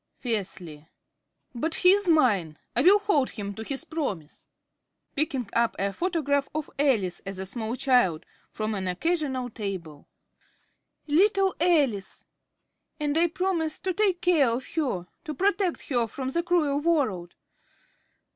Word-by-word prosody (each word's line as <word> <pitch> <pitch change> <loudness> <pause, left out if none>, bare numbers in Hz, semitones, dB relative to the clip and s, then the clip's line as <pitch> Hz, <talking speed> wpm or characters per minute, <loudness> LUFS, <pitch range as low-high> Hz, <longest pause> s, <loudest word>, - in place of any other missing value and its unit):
(Fiercely.) 180 - -4 0.7
But 315 +7 -2
he 365 - +6
is 405 0 +2
mine; 205 - +3 0.2
I 240 - +3
will 380 +7 +7
hold 400 -11 +1
him 200 -2 -6
to 220 - -7
his 270 +4 -3
promise! 205 - -5 0.7
(Picking 280 -6 -1
up 235 0 +2
a 195 0 -1
photograph 285 - 0
of 310 -1 -3
Alice 220 -11 +1
as 195 -1 -6
a 190 - -4
small 225 +3 -4
child 245 - +2 0.2
from 215 0 -3
an 190 -2 -3
occasional 265 - -1
table.) 185 -9 -6 1.0
Little 385 +5 +3
Alice! 280 - +1 0.7
And 295 -1 -1
I 335 +2 +4
promised 340 -2 -2
to 375 - 0
take 380 -2 +1
care 320 -8 +4
of 240 +3 -2
her 255 - -1 0.2
to 310 - -5
protect 390 +1 0
her 240 -4 +1
from 260 +4 -5
the 340 - +1
cruel 330 -5 +1
world. 255 - 0
275 Hz, 140 wpm, -26 LUFS, 205-335 Hz, 1.0 s, will